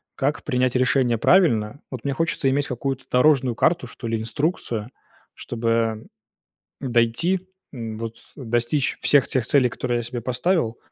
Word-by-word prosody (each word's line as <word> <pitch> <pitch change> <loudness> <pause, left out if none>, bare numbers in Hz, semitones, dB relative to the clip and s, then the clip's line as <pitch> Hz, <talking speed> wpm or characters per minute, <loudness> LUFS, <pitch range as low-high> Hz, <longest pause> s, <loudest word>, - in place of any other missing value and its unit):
как 145 +1 -1
принять 125 -2 0
решение 125 -1 +2
правильно. 120 - +3
Вот 130 0 -7
мне 140 - 0
хочется 160 -2 0
иметь 140 +2 0
какую-то 135 +1 -3
дорожную 125 -2 +3
карту, 170 +6 +1
что 120 - -8
ли, 115 0 0
инструкцию, 115 - -2 0.4
чтобы 115 -1 -1 0.7
дойти, 135 +10 +1 0.2
вот 115 -2 -6 0.2
достичь 120 +2 -1
всех 140 -2 +4
тех 125 -4 0
целей, 135 -3 +4
которые 120 +1 -2
я - - -2
себе 120 +1 -5
поставил, 125 - 0
125 Hz, 135 wpm, -23 LUFS, 115-140 Hz, 0.7 s, всех